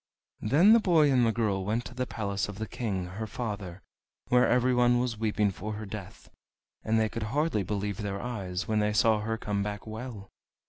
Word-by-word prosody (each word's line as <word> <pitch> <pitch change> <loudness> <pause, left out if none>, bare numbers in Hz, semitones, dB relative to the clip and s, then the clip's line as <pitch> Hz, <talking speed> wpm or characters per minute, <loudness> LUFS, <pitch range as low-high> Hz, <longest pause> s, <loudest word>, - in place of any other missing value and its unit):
Then 160 - +5
the 230 - +7
boy 165 -8 +4
and 125 -2 +4
the - - +3
girl 105 -4 0
went 110 +5 -1
to - - -8
the 125 0 -3
palace 100 -2 -2
of 100 - -7
the 110 - -3
King, 100 -5 -3
her 100 +5 -6
father, 100 -4 -5 0.5
where 125 0 +5
everyone 125 0 +3
was 120 -3 -2
weeping 105 -2 +1
for 105 +3 -5
her 105 +1 -6
death, 100 -2 -9 0.5
and 110 +1 +2
they 110 - +2
could 115 +1 -5
hardly 145 -4 +1
believe 100 +1 -2
their 100 -3 -3
eyes 95 -7 -4
when 110 -1 +1
they 105 0 +1
saw 110 0 +4
her 115 +2 -2
come 105 -2 -2
back 105 0 -4
well. 110 -2 -7
110 Hz, 200 wpm, -29 LUFS, 100-120 Hz, 0.5 s, the